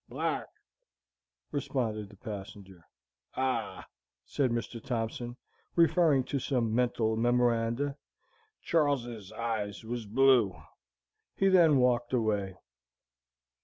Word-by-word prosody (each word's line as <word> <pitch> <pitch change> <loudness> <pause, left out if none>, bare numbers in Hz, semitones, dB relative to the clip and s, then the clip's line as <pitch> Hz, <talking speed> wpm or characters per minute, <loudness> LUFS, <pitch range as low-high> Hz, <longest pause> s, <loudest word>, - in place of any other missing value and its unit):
"Black," - - -2 1.0
responded 125 -7 -2
the 100 - -15
passenger. 100 -4 -9 0.5
"Ah," 130 0 -2 0.4
said 135 -3 0
Mr. 115 0 -4
Thompson, 120 0 -3 0.4
referring 165 -4 +4
to 140 - -2
some 120 -4 0
mental 120 -2 +1
memoranda, 120 +3 +1 0.7
"Char 155 -4 +3
les's 115 -6 -8
eyes 110 -2 -3
was 115 -1 -5
blue." 120 -4 +4 0.8
He 195 - +3
then 170 -6 +6
walked 125 -1 +2
away. 105 -5 0
120 Hz, 95 wpm, -30 LUFS, 110-135 Hz, 1.0 s, then